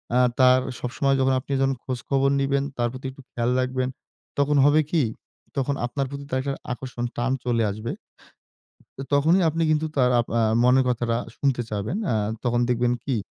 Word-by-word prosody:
আ - - +5 0.2
তার 130 0 +6 0.2
সবসময় 135 +2 0
যখন 130 0 +3
আপনি 135 - -10
যখন 135 0 +2
খোঁজখবর 135 +2 0
নিবেন, 135 0 +1
তার 120 -1 +1
প্রতি 130 +1 -9
একটু 135 - -14
খেয়াল 120 +1 0
রাখবেন। 130 0 -1 0.5
তখন 145 +1 +3
হবে 150 +2 +5
কি? 165 -4 +3 0.5
তখন 140 +1 0
আপনার 135 +3 -2
প্রতি 140 0 -6 0.2
একটা 140 +1 -2 0.2
আকর্ষণ, 125 -1 -5
টান 120 +2 0
চলে 120 -2 +1
আসবে। 110 +3 -5 1.2
তখনই 160 +7 +4
আপনি 165 +1 -1
কিন্তু 155 0 +2
তার 125 -2 +4
আপ 120 - -3
আ - - +3 0.2
মনের 130 +1 +5
কথাটা 120 -1 0 0.2
শুনতে 135 -3 +1
চাবেন। 105 - -2 0.2
আ - - +1 0.3
তখন 120 -1 +1
দেখবেন 120 0 +2
কি? 135 -3 0
130 Hz, 170 wpm, -24 LUFS, 120-140 Hz, 1.2 s, তার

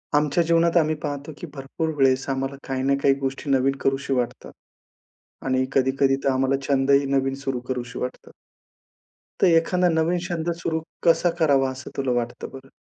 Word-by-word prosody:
आमच्या 150 +3 +2
जीवनात 170 +1 +3
आम्ही 155 -1 +2
पाहतो 145 0 -4
की 175 - -7
भरपूर 140 +4 -4
वेळेस 135 -1 +2
आम्हाला 135 0 -2
काही 130 -1 -2
ना 140 +1 +2
काही 135 - +5
गोष्टी 135 +2 -4
नवीन 135 0 +3 0.4
वाटतात. 125 0 -3 0.9
आणि 130 0 +1
कधी-कधी 135 0 +2
तर - - +2
आम्हाला 135 +1 +2
छंदही 140 0 +3
नवीन 135 0 +1
सुरु 135 -2 -2
करूशी 125 -1 -4
वाटतात. 125 - -6 1.1
तर - - +6
एखादा 180 +2 +2
नवीन 165 +2 +1
छंद 170 -2 -2
सुरू 160 -1 -1 0.2
कसा 170 +1 +4
करावा, 135 -4 +3
असं 130 0 -9
तुला 135 -2 0
वाटतं 120 +1 -7
बरं? 135 0 -11
135 Hz, 160 wpm, -24 LUFS, 130-160 Hz, 1.1 s, तर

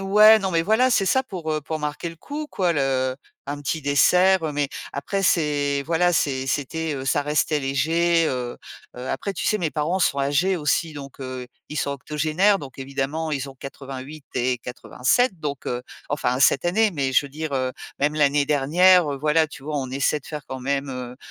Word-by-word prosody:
ouais, 210 +3 +7
non, 195 -2 -2
mais 165 -2 +2
voilà, 220 +8 +3
c'est 215 -4 +3
ça 260 +8 +3
pour, 180 -10 -5
heu, 155 - -1
pour 155 +2 -4
marquer 150 +2 -3
le 165 - -10
coup, 295 - -6
quoi, 180 -3 +1
le 135 -3 0 0.3
un 145 +1 -4
petit 155 +2 -2
dessert. 165 +4 +4
Mais 145 -1 0 0.2
après, 195 +8 -2
c'est 145 -5 +1
voilà, 170 +3 +2
c'est 135 -5 0
c'était, 150 +4 -2
heu, 135 -1 -5
ça 140 +2 +1
restait 150 +1 +1
léger, 165 +5 +2
heu 125 -2 -3 0.4
heu, 125 +1 -6
après, 200 - -3
tu - - -3
sais, 215 - +2
mes 170 -5 -1
parents 160 +5 -1
sont 140 -6 +1
âgés 145 +7 +2
aussi, 160 +1 0
donc, 140 -1 -9
heu, 130 -1 -6 0.2
ils 150 - -6
sont 140 - 0
octogénaires. 155 +8 +1
Donc 135 -5 -10
évidemment, 140 +4 -3
ils 140 -1 -3
ont - - -14
88 135 +2 -9
et 125 0 +1
87, 130 - 0
donc, 145 -3 -4
heu, 125 0 -2 0.3
enfin, 125 -3 0
cette 135 - +4
année, 210 +5 +3
mais 135 -4 -1
je 140 - +3
veux - - -13
dire, 155 +1 -5
heu, 130 -1 -1 0.3
même 150 +2 +1
l'année 145 -1 +3
dernière, 155 +3 +4
heu, - - -3
voilà, 155 +2 +3
tu 145 - -12
vois, 150 0 -3
on 130 -2 -4
essaie 140 +3 0
de - - -18
faire 150 -3 -7
quand 130 - -6
même, 140 +2 -1
heu 125 -1 -6
150 Hz, 205 wpm, -23 LUFS, 135-170 Hz, 0.4 s, ouais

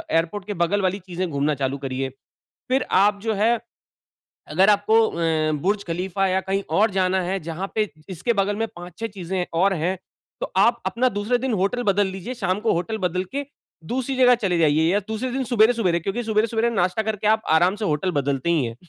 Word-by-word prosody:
Airport 170 +5 0
के 205 - -3
बगल 200 +4 0
वाली 190 +2 0
चीज़ें 180 -1 -4
घूमना 145 +1 0
चालू 135 0 -2
करिए। 135 -1 -3 0.6
फिर 260 0 +2 0.2
आप 205 0 +2
जो 225 -1 0
है, 225 +3 +2 0.9
अगर 185 +7 +4
आपको 210 +2 +4
अ, 160 -2 0
बुर्ज 200 +2 0
खलीफा 185 +3 -1
या 190 0 +1
कहीं 195 +1 -2 0.2
और 220 - +4
जाना 190 -1 +1
है, 190 +2 -1
जहाँ 170 +4 -5
पे 215 -2 0 0.2
इसके 190 +6 -1
बगल 200 0 0
में 225 - -1
5-6 175 +5 -6
चीज़ें 185 -3 -3
और 190 +4 +3
हैं, 175 +3 -1 0.4
तो - - -3
आप - - +4
अपना 255 +2 +2
दूसरे 205 +3 0
दिन 260 0 -2
होटल 200 +6 0
बदल 205 -2 +2
लीजिए, 190 +6 -6
शाम 195 -4 -1
को 225 - +1
होटल 180 +6 -2
बदल 180 0 0
के 285 +1 -2 0.5
दूसरी 260 +2 -2
जगह 250 -1 +6
चले 190 -7 0
जाइए, 155 -1 +3
या 205 - +3
दूसरे 230 +4 -3
दिन 265 0 -1
सुबेरे-सुबेरे, 220 -6 +3
क्योंकि 195 +8 -2
सुबेरे-सुबेरे 225 +1 +1
नाश्ता 185 0 0
करके, 215 -1 -3
आप 220 +1 +3
आराम 180 +4 +3
से 210 - -4
होटल 155 +2 0
बदलते 140 +3 -1
ही 160 -6 +2
हैं 115 -1 -4
195 Hz, 200 wpm, -23 LUFS, 175-220 Hz, 0.9 s, जगह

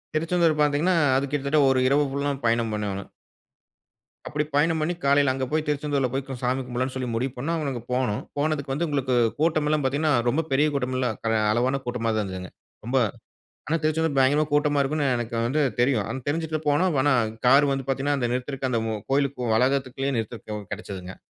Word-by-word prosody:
திருச்செந்தூர் 165 0 +2
பார்த்தீங்கனா 150 +5 +2 0.2
அது 135 +1 +1
கிட்டத்தட்ட 145 +1 +1
ஒரு 130 -1 +3
இரவு 145 +2 +3
ஃபுல்லா 140 +1 -1
பயணம் 115 -1 +1
பண்னோனு. 100 -2 -3 1.2
அப்படி 150 0 -1
பயணம் 160 +2 +2
பண்ணி 170 +3 0
காலையில 140 -1 +4
அங்க 130 0 -2
போய் 155 0 0
திருச்செந்தூர்ல 145 -2 0
போய் 135 0 -1 0.2
சாமி 130 +1 0
கும்பிடலாம்னு 130 +1 -3
சொல்லி 130 -1 -3
முடிவு 125 +3 -1
பண்ணா, 150 +7 -2
அவங்க 145 -3 -2
அங்க 120 -3 -5
போனோம். 125 -5 0 0.2
போனதுக்கு 145 -2 -1
வந்து 165 +4 -1
உங்களுக்கு 135 -3 0 0.2
கூட்டமெல்லா 155 -1 +2
பார்த்தீங்கனா, 145 +3 +1 0.2
ரொம்ப 160 +6 +1
பெரிய 145 +3 +3
கூட்டமெல்லாம் 130 -3 -1 0.3
அளவான 125 +4 +1
கூட்டமா 115 -2 -1
தான் 105 - +1
இருந்ததுங்க. 95 -1 -6 0.3
ரொம்ப 130 +3 0 0.7
ஆனா 165 - +1
திருச்செந்தூர் 155 -2 0
பயங்கரமா 140 +3 +4
கூட்டமா 145 0 +2
இருக்குனு 145 +1 0
எனக்கு 120 0 -4
வந்து 150 +4 +1 0.2
தெரியும். 120 -4 +2
ஆனா 135 - -3
தெருஞ்சுட்டு 155 +1 -1
போனோம். 155 +3 +2
ஆனா 145 0 +3 0.3
கார் 140 +3 +6
வந்து, 135 -1 -2
பார்த்தீங்கனா 140 +2 0
அந்த 120 - 0
நிறுத்துறதுக்கு 130 +1 -2
அந்த 115 -2 +1 0.3
கோவிலுக்கு 140 0 +1
போற 120 - -1
வளாகத்திற்குள்ளயே 135 +2 0
நிறுத்தருக்கு 110 -1 -5
கெடச்சதுங்க. 95 -3 -7
135 Hz, 170 wpm, -25 LUFS, 125-150 Hz, 1.2 s, கார்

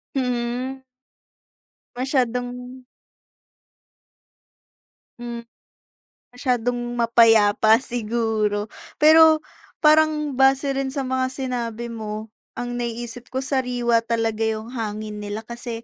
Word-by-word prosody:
Mhm. 250 +1 -2 1.1
Masyadong 250 -1 -2 2.4
Hmm, 240 -1 -6 0.9
masyadong 245 -1 -2
mapayapa 225 -1 +4
siguro. 220 -3 -1 0.2
Pero 315 0 +6 0.4
parang 305 -1 +4
base 270 +1 +4
rin 270 0 -1
sa 275 - -1
mga 260 0 0
sinabi 240 -3 -4
mo, 215 -1 -6 0.2
ang 245 0 -4
naiisip 240 0 -5
ko 260 +1 -3
sariwa 250 -3 +1
talaga 225 -1 -1
yung 220 +1 -4
hangin 215 -3 -5
nila 205 +1 -5
kasi 235 0 -7
240 Hz, 85 wpm, -22 LUFS, 225-260 Hz, 2.4 s, Pero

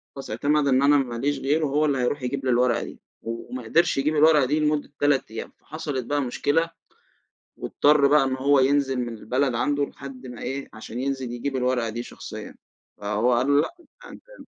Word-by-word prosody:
خلاص 135 - -8
اعتمَد 145 +6 +1
إن 130 0 +3
أنا 145 +1 +5
ما 125 -4 -1
ليش 140 +3 -1
غيره، 150 +4 +1
هو 150 +2 +1
اللي 140 -2 +1
هيرُوح 130 +2 -1
يجيب 135 +2 -3
لي 130 - +2
الورقة 125 0 +2
دي، - - -10 0.2
وما 115 +2 -6
قدِرش 165 +9 +2
يجيب 150 +3 +1
الورقة 150 -2 +5
دي 150 +4 0
لمدة 150 -1 0
3 145 -6 +1
أيام، 115 - -6
فحصِلِت 145 -6 -5
بقى 145 +1 0
مشكلة، 145 +6 0 0.9
واضطَر 145 -1 +3
بقى 145 -1 +5
إنه 130 0 -2
هو 140 +1 +4
ينزِل 135 0 +2
من 120 -1 -4
البلد 130 +4 0
عنده 145 +4 +1
لحد 135 -2 -10
ما 125 -2 -9
إيه، 135 +2 -4
عشان 110 +2 -7
ينزِل 130 -2 -3
يجيب 130 +3 -3
الورقة 125 -2 0
دي 120 +2 -4
شخصيًا. - - -9 0.5
فهو 105 +4 +1
قال 120 +2 +1
له: 145 0 +5
"لأ 335 - -5 0.4
أنتَ - - -13 0.2
م" - - -11
135 Hz, 200 wpm, -24 LUFS, 125-145 Hz, 0.9 s, أنا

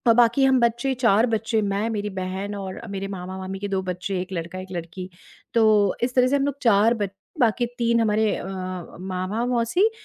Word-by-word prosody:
बाकी 240 +3 +4
हम 265 -1 +4
बच्चे, 235 +3 +1
4 230 -3 +3
बच्चे, 225 0 0
मैं, 205 +2 -1
मेरी 210 -2 -2
बहन 190 +2 -4
और 190 -2 -6
अ, 230 - -9
मेरे 195 -1 -4
मामा-मामी 190 0 -6
के 205 - -3
2 195 -1 -1
बच्चे, 180 +1 -3
1 185 - -8
लड़का, 170 +1 -4
1 185 0 -9
लड़की। 175 +1 -6 0.4
तो 215 -4 +4
इस 250 +1 -1
तरह 250 -1 +5
से 270 - +2
हम 275 -1 +2
लोग 285 -1 -2
4 225 -1 +5
बच 205 -4 -2 0.3
बाकी 240 0 +3
3 235 -1 +2
हमारे 215 -1 +2
अ, - - -6 0.5
मामा, 185 +5 -2
मौसी, 245 - +2
210 Hz, 195 wpm, -24 LUFS, 190-235 Hz, 0.5 s, तरह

